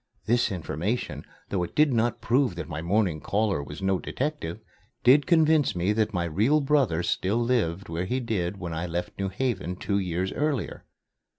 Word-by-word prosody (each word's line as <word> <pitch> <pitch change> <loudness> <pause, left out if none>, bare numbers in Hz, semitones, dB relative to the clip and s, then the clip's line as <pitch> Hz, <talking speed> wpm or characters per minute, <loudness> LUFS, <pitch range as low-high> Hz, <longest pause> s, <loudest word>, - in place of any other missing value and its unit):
This 120 +1 +2
information, 95 - -3 0.3
though 95 - 0
it 90 - -4
did 150 -3 +4
not 115 0 +1
prove 125 -4 +2
that 85 - -5
my 80 -1 -5
morning 90 -3 +1
caller 100 -6 0
was 75 +6 -8
no 95 -1 +2
detective, 135 - -3 0.4
did 140 +4 +6
convince 160 - +4
me 90 +4 +1
that 110 0 +1
my 90 -4 -1
real 105 - +2
brother 135 - +2
still 95 +5 0
lived 110 -7 0
where 85 +2 -3
he 125 +7 -1
did 100 -6 -2
when 85 -3 -5
I 80 +2 -3
left 90 +3 -4
New 100 0 -1
Haven, 105 -4 -2
two 100 +2 -1
years 90 0 -2
earlier. 145 -6 -2
100 Hz, 180 wpm, -26 LUFS, 85-125 Hz, 0.4 s, did